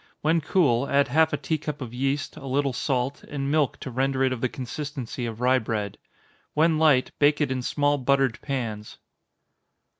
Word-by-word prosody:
When 160 +2 +2
cool, 140 -6 +2
add 140 0 +3
half 160 +1 +3
a - - 0
tea 160 -1 -2
cup 150 -1 -5
of 125 -4 -7
yeast, 135 +3 -1
a 135 - -9
little 135 0 0
salt, 130 +1 -1
and 140 -1 -3
milk 150 -4 +1
to 130 - -5
render 135 +2 0
it 130 -1 +2
of 120 - -6
the 130 - +1
consistency 130 -2 -5
of 115 +1 -7
rye 130 +1 +4
bread. 105 -3 -3 0.6
When 160 +1 +3
light, 150 -5 +4
bake 145 0 +4
it 150 -3 +1
in 130 -1 -1
small 145 +3 +1
buttered 135 -2 +1
pans. 115 -7 -4
135 Hz, 185 wpm, -25 LUFS, 125-145 Hz, 0.6 s, rye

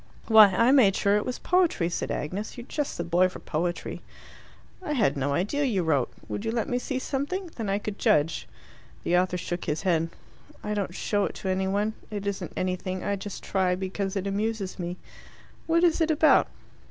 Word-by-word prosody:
"Why, 220 -2 +9
I 230 +7 +3
made 230 -9 +5
sure 200 0 +2
it 210 - -2
was 250 - -2
poetry!" 350 - +2
said 170 - -3
Agnes. 195 - -4
"You're 240 - -7
just 295 +1 -3
the 170 - -2
boy 175 +2 +3
for - - -9
poetry." 175 +2 -3 0.8
"I 360 -5 -3
had 225 - +2
no 140 0 -1
idea 205 - 0
you 210 -10 +1
wrote. 145 -6 +1 0.2
Would 205 - -4
you 225 - -1
let 230 -1 -1
me 245 - 0
see 260 +1 -3
something? 305 +8 -3
Then 220 -4 -3
I 195 - +2
could 210 0 -5
judge." 165 -8 +2 0.6
The 175 - +1
author 180 0 +2
shook 175 0 -4
his 150 +4 -2
head. 165 -3 +1 0.5
"I 210 - -2
don't 195 -4 -2
show 205 -1 0
it - - -5
to 190 - -4
any 190 0 0
one. 205 +3 0 0.2
It 205 -2 -5
isn't 200 -1 -3
anything. 185 0 -2
I 200 - 0
just 200 0 -7
try 185 -2 +1
because 190 +1 -3
it 195 -1 -2
amuses 200 -1 -2
me." 175 0 -4 0.7
"What 335 +1 +3
is 340 -1 +3
it 320 - +3
about?" 315 0 +5
200 Hz, 200 wpm, -27 LUFS, 180-235 Hz, 0.8 s, Why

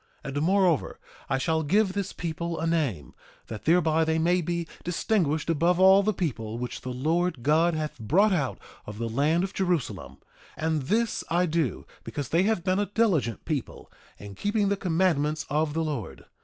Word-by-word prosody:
1:11 135 - -5
And 145 - 0
moreover, 180 -3 +2 0.3
I 135 - +1
shall 160 +4 0
give 190 +5 +2
this 200 -1 -3
people 170 0 -4
a 165 - -2
name, 145 - -1 0.3
that 110 -2 -8
thereby 160 -1 +3
they 160 0 +1
may 175 +3 +2
be 170 0 -3 0.2
distinguished 170 -3 0
above 170 +2 +2
all 190 +1 +7
the 210 +2 +1
people 120 - -3
which 125 0 -5
the 130 - -6
Lord 155 +2 -1
God 160 +4 +3
hath 155 -1 -4
brought 190 - +3
out 145 -7 -1 0.3
of 105 0 -7
the 115 +1 -2
land 145 +9 +1
of 190 - -4
Jerusalem; 180 -8 -2 0.4
and 160 -1 0
this 220 - 0
I 175 +2 +2
do 160 -6 -1 0.2
because 145 -4 -5
they 165 - +3
have 200 -3 +1
been 185 +2 +1
a 205 - 0
diligent 185 - 0
people 150 -6 -4 0.3
in 100 0 -10
keeping 205 - 0
the 200 - +2
commandments 160 -5 0
of 150 0 0
the 165 - +1
Lord. 145 -9 -5
165 Hz, 185 wpm, -26 LUFS, 145-180 Hz, 0.4 s, all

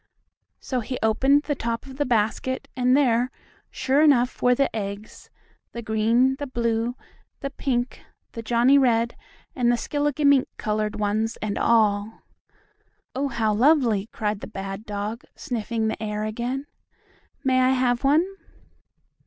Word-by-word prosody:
So 255 - -3
he 250 +2 -4
opened 270 +6 +3
the 295 - -1
top 230 -3 -3
of 265 -1 -11
the 290 - 0
basket 235 +3 0
and 255 +1 +3
there, 245 -3 +2 0.4
sure 275 +3 +1
enough, 260 -5 +3
were 250 0 +4
the 275 -2 0
eggs, 200 0 -6 0.4
the 235 - -6
green, 230 +5 +2
the 285 0 -5
blue, 235 -1 -1 0.5
the 275 - -4
pink, 250 -3 -2 0.3
the 230 - -6
Johnnie 240 +4 +4
red 235 -3 +2 0.4
and 240 -2 +2
the 240 - +2
skilligimink 290 0 +2
colored 215 0 -2
ones 215 +2 -1
and 210 -1 -3
all. 215 -2 +1 0.9
"Oh, 275 +2 -1
how 225 -4 0
lovely!" 235 -4 +3
cried 210 -2 -3
the - - -8
bad 195 +2 -7
dog, 210 +2 -4
sniffing 230 -2 -2
the 220 - -3
air 210 -1 -3
again. 240 +5 -3 0.8
"May 260 -2 +3
I 255 - +4
have 250 -1 +1
one?" 295 +5 +4
235 Hz, 145 wpm, -24 LUFS, 220-265 Hz, 0.9 s, were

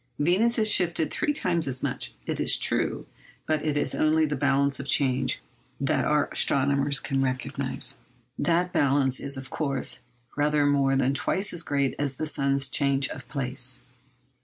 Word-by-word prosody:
Venus 185 +11 +2
is 215 -1 +3
shifted 175 -5 +3
three 300 - 0
times 170 - 0
as 130 -1 0
much, - - -4
it - - -3
is - - +3
true; - - -1 0.4
but 155 -1 0
it 150 -2 0
is - - +1
only 155 +1 +2
the 150 -1 -2
balance 140 +1 +1
of 140 - -6
change 130 -2 +1 0.4
that - - 0
our - - +2
astronomer 140 +1 +2
can 135 -1 -1
recognise. 130 -1 -2 0.4
That 175 +3 0
balance 135 -2 +2
is, 140 -1 -4
of 130 0 -7
course, 135 -4 -1 0.3
rather 150 0 +2
more 140 -1 +2
than 135 0 +1
twice 195 +7 0
as 170 - 0
great 140 -4 0
as 140 -2 -1
the 155 - -3
sun's 140 -2 +1
change 140 +1 0
of 135 -2 -9
place. 130 -2 -2
140 Hz, 165 wpm, -26 LUFS, 135-155 Hz, 0.4 s, is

